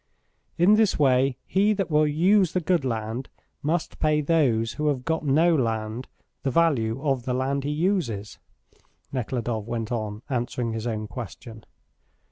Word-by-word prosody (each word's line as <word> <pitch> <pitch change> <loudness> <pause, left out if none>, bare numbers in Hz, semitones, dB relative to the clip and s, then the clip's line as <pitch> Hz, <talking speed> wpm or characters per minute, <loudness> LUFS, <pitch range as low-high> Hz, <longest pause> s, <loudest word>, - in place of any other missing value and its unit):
In 180 +5 +5
this 220 -3 +3
way: 130 -2 +3
he 205 +3 +2
that 195 -4 -2
will 150 0 +4
use 180 +4 +3
the 185 - +2
good 175 -2 +1
land 115 0 -3 0.3
must 160 +3 -2
pay 155 -1 +2
those 140 -8 +2
who 150 0 -2
have 130 -4 -1
got 160 -1 -1
no 155 +5 +4
land 115 -2 -2 0.3
the 135 - -1
value 135 -7 +2
of 135 -5 0
the 125 - -1
land 135 +2 -1
he - - -1
uses," 150 - -1 0.7
Nekhludoff 120 -3 -2
went 115 0 -3
on, 110 -1 -3
answering 120 -2 -2
his 115 +1 -3
own 110 -2 -2
question. 110 0 -9
130 Hz, 155 wpm, -25 LUFS, 115-160 Hz, 0.7 s, In